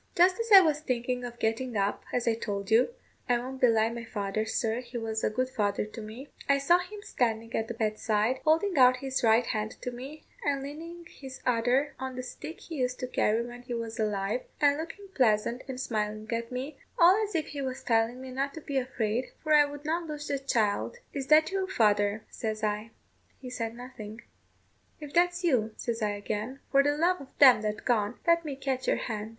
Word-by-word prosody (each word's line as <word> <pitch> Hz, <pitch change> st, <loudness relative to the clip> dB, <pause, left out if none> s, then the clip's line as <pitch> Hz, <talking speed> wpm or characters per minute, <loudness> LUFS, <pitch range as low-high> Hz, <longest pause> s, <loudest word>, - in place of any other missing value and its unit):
"Just 365 Hz, +4 st, +5 dB
as 460 Hz, -1 st, -3 dB
I 390 Hz, -2 st, +11 dB
was 310 Hz, -4 st, +2 dB
thinking 250 Hz, -2 st, -2 dB
of 240 Hz, -1 st, -6 dB
getting 225 Hz, +1 st, -1 dB
up, 200 Hz, 0 st, -1 dB
as 245 Hz, -1 st, -1 dB
I 230 Hz, -, +4 dB
told 200 Hz, -3 st, -4 dB
you 230 Hz, -, +5 dB, 0.4 s
I 245 Hz, -, +4 dB
won't 260 Hz, +2 st, -6 dB
belie 225 Hz, -2 st, +4 dB
my 235 Hz, 0 st, -6 dB
father, 215 Hz, -1 st, -2 dB
sir, 225 Hz, +1 st, 0 dB
he 245 Hz, 0 st, -7 dB
was 220 Hz, -1 st, -3 dB
a -, -, +3 dB
good 255 Hz, +4 st, -1 dB
father 210 Hz, -6 st, -1 dB
to 215 Hz, +2 st, -9 dB
me 220 Hz, +6 st, -9 dB, 0.2 s
I 280 Hz, -, +5 dB
saw 310 Hz, +6 st, +4 dB
him 410 Hz, +3 st, -8 dB
standing 230 Hz, -, -1 dB
at 225 Hz, -, -1 dB
the 235 Hz, -, -5 dB
bedside, 220 Hz, +2 st, 0 dB
holding 330 Hz, +5 st, +2 dB
out 255 Hz, 0 st, +7 dB
his 265 Hz, 0 st, -2 dB
right 230 Hz, +1 st, +5 dB
hand 215 Hz, -1 st, -2 dB
to 250 Hz, -, -3 dB
me, 270 Hz, +6 st, -9 dB, 0.2 s
and 280 Hz, -2 st, 0 dB
leaning 335 Hz, +4 st, -8 dB
his 270 Hz, -5 st, -10 dB
other 250 Hz, +4 st, +2 dB
on 260 Hz, 0 st, -4 dB
the 255 Hz, -, -4 dB
stick 305 Hz, +6 st, -8 dB
he 325 Hz, -, -7 dB
used 250 Hz, -1 st, -1 dB
to -, -, -1 dB
carry 230 Hz, -1 st, +1 dB
when 245 Hz, 0 st, -9 dB
he 245 Hz, -1 st, -5 dB
was 230 Hz, 0 st, -5 dB
alive, 210 Hz, +2 st, 0 dB, 0.2 s
and 285 Hz, -1 st, +4 dB
looking 335 Hz, +6 st, -7 dB
pleasant 235 Hz, 0 st, +2 dB
and 260 Hz, -1 st, -5 dB
smiling 215 Hz, -3 st, -2 dB
at 230 Hz, +1 st, -3 dB
me, 265 Hz, +3 st, -5 dB, 0.2 s
all 370 Hz, +5 st, +6 dB
as 415 Hz, -3 st, -4 dB
if 315 Hz, -1 st, -1 dB
he 285 Hz, -1 st, -5 dB
was 260 Hz, -1 st, -4 dB
telling 230 Hz, +1 st, +1 dB
me 260 Hz, 0 st, -8 dB
not 275 Hz, +3 st, -2 dB
to 320 Hz, -, -7 dB
be 280 Hz, -2 st, -1 dB
afeard, 245 Hz, -2 st, -1 dB, 0.2 s
for 310 Hz, -1 st, +2 dB
I 295 Hz, -1 st, +7 dB
would 290 Hz, 0 st, -9 dB
not 330 Hz, +2 st, -1 dB
lose 295 Hz, -1 st, -6 dB
the 280 Hz, -, 0 dB
child. 230 Hz, -, 0 dB, 0.2 s
'Is 275 Hz, -2 st, -4 dB
that 310 Hz, +3 st, +5 dB
you, 385 Hz, -1 st, -1 dB
father?' 210 Hz, -, +2 dB
says 215 Hz, -1 st, -4 dB
I. 210 Hz, +1 st, -1 dB, 0.5 s
He 250 Hz, -2 st, -9 dB
said 230 Hz, -2 st, -3 dB
nothing. 235 Hz, -3 st, -9 dB, 0.8 s
'If 295 Hz, -2 st, -9 dB
that's 355 Hz, +1 st, +2 dB
you,' 235 Hz, -10 st, +2 dB
says 235 Hz, -1 st, -3 dB
I 210 Hz, -1 st, +1 dB
again, 210 Hz, +5 st, -4 dB
'for 275 Hz, -, +6 dB
the 290 Hz, +1 st, +1 dB
love 350 Hz, +2 st, +2 dB
of 275 Hz, -, -14 dB
them 260 Hz, -6 st, +8 dB
that 215 Hz, 0 st, -3 dB
gone, 220 Hz, -2 st, +1 dB
let 335 Hz, 0 st, +4 dB
me 290 Hz, -3 st, -4 dB
catch 265 Hz, -1 st, -3 dB
your -, -, +3 dB
hand.' 215 Hz, -2 st, -4 dB
250 Hz, 215 wpm, -29 LUFS, 225-285 Hz, 0.8 s, I